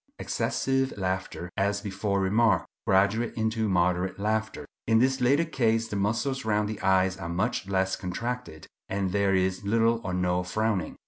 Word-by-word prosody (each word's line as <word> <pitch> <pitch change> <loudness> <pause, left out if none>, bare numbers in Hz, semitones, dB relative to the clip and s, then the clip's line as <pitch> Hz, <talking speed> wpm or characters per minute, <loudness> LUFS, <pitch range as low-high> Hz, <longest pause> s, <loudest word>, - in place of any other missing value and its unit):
Excessive 135 -2 -1
laughter, 95 -2 -3
as 100 +1 0
before 100 0 -1
remarked, 105 +1 +3 0.2
graduates 100 +6 +2
into 110 -1 0
moderate 90 0 +1
laughter. 110 +1 -2 0.2
In 110 0 +4
this 130 +3 +2
latter 140 +7 +3
case 115 -7 0
the - - -4
muscles 115 +7 -1
round 105 -1 +1
the 105 -1 -5
eyes 95 0 +2
are 85 -3 -6
much 100 +4 -1
less 95 0 +1
contracted, 115 -2 -5 0.2
and 95 -1 -1
there 100 0 +2
is 95 +1 0
little 115 +2 +2
or 90 - -3
no 90 0 +1
frowning. 100 0 -1
100 Hz, 155 wpm, -27 LUFS, 95-115 Hz, 0.2 s, In